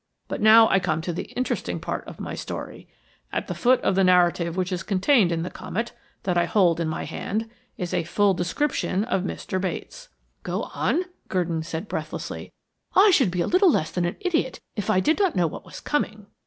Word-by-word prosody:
But -, -, -4 dB
now 220 Hz, +1 st, +8 dB
I 195 Hz, -, +3 dB
come 160 Hz, -4 st, 0 dB
to 175 Hz, +1 st, -3 dB
the 170 Hz, -, -4 dB
interesting 255 Hz, +1 st, -2 dB
part -, -, -4 dB
of -, -, -10 dB
my -, -, -5 dB
story. -, -, -6 dB, 0.4 s
At -, -, -2 dB
the -, -, -4 dB
foot 255 Hz, +1 st, +3 dB
of -, -, +2 dB
the 195 Hz, +1 st, +3 dB
narrative 175 Hz, -1 st, +3 dB
which 185 Hz, 0 st, -1 dB
is 180 Hz, -2 st, -2 dB
contained 195 Hz, +1 st, +3 dB
in 165 Hz, -1 st, -1 dB
the 180 Hz, -, -5 dB
Comet, 230 Hz, +4 st, -4 dB, 0.3 s
that 180 Hz, -2 st, +1 dB
I 170 Hz, -, +3 dB
hold 170 Hz, -2 st, +3 dB
in 165 Hz, -, 0 dB
my 155 Hz, -, -3 dB
hand, 220 Hz, +3 st, -3 dB, 0.3 s
is 180 Hz, -1 st, -4 dB
a -, -, +1 dB
full 200 Hz, +4 st, +2 dB
description 195 Hz, -, 0 dB
of 205 Hz, -5 st, 0 dB
Mr. 185 Hz, 0 st, -3 dB
Bates." -, -, -5 dB, 0.3 s
"Go -, -, -3 dB
on," 360 Hz, -, +1 dB, 0.2 s
Gurdon 170 Hz, -3 st, -1 dB
said 160 Hz, +4 st, -5 dB
breathlessly. -, -, -5 dB, 0.4 s
"I 400 Hz, +2 st, +7 dB
should 265 Hz, -, +4 dB
be 175 Hz, -1 st, 0 dB
little 370 Hz, +1 st, +4 dB
less 155 Hz, -, +1 dB
than 175 Hz, 0 st, 0 dB
an 175 Hz, -, -2 dB
idiot 330 Hz, -9 st, 0 dB, 0.2 s
if 210 Hz, -, -3 dB
I 185 Hz, -, +4 dB
did 315 Hz, -, +2 dB
not 385 Hz, -4 st, +2 dB
know 180 Hz, -, +3 dB
what 160 Hz, -, -5 dB
was -, -, -9 dB
coming." 215 Hz, -8 st, -2 dB
185 Hz, 210 wpm, -25 LUFS, 175-235 Hz, 0.4 s, now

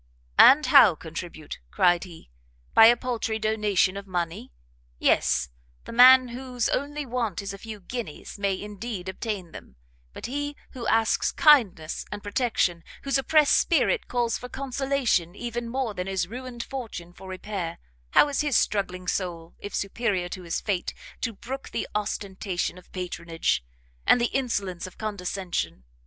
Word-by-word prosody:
"And 295 Hz, +3 st, +8 dB
how 230 Hz, -, +7 dB
contribute?" 160 Hz, -1 st, -8 dB
cried 175 Hz, -, +3 dB
he, 165 Hz, -, -14 dB, 0.4 s
"by 225 Hz, -, +9 dB
a 240 Hz, +1 st, +6 dB
paltry 235 Hz, -3 st, -2 dB
donation 210 Hz, -3 st, +1 dB
of 200 Hz, 0 st, -7 dB
money? 170 Hz, -, -3 dB, 0.5 s
Yes, 65 Hz, +2 st, +2 dB, 0.4 s
the -, -, -8 dB
man 255 Hz, +1 st, +8 dB
whose 250 Hz, -1 st, -2 dB
only 290 Hz, +1 st, -2 dB
want 235 Hz, -6 st, -2 dB
is 200 Hz, -1 st, -5 dB
a 195 Hz, -, -9 dB
few 220 Hz, -1 st, -8 dB
guineas, 200 Hz, -3 st, -7 dB
may, 195 Hz, -2 st, 0 dB
indeed, 205 Hz, -2 st, -6 dB
obtain 190 Hz, -2 st, -4 dB
them; 65 Hz, -, -12 dB, 0.4 s
but -, -, -8 dB
he 290 Hz, +4 st, -3 dB, 0.2 s
who 245 Hz, -3 st, -6 dB
asks 225 Hz, -1 st, +2 dB
kindness 220 Hz, -, +4 dB
and 205 Hz, 0 st, -6 dB
protection, 205 Hz, -6 st, 0 dB, 0.2 s
whose 275 Hz, -1 st, +1 dB
oppressed 300 Hz, +2 st, +4 dB
spirit -, -, +2 dB
calls 240 Hz, -2 st, 0 dB
for 250 Hz, -, -8 dB
consolation 265 Hz, -10 st, 0 dB
even 240 Hz, 0 st, -4 dB
more 255 Hz, -3 st, -2 dB
than 180 Hz, -1 st, -4 dB
his 190 Hz, -2 st, -1 dB
ruined 245 Hz, +2 st, -6 dB
fortune 220 Hz, -10 st, -7 dB
for 190 Hz, -, -12 dB
repair, 185 Hz, -3 st, -5 dB, 0.3 s
how -, -, +6 dB
is 285 Hz, 0 st, 0 dB
his 295 Hz, -4 st, +2 dB
struggling 185 Hz, -3 st, -1 dB
soul, 170 Hz, -3 st, -3 dB
if 205 Hz, -, -6 dB
superior 195 Hz, -3 st, -1 dB
to 185 Hz, -, -6 dB
his 170 Hz, -2 st, -2 dB
fate, 190 Hz, -4 st, -2 dB, 0.3 s
to 230 Hz, -, -1 dB
brook 255 Hz, +6 st, -7 dB
the -, -, -3 dB
ostentation 195 Hz, -3 st, -3 dB
of 180 Hz, -, -21 dB
patronage, 170 Hz, -, -2 dB, 0.4 s
and -, -, +6 dB
the 240 Hz, -, 0 dB
insolence 200 Hz, -9 st, -2 dB
of 185 Hz, -, -14 dB
condescension? 190 Hz, -, -3 dB
210 Hz, 155 wpm, -26 LUFS, 180-245 Hz, 0.5 s, by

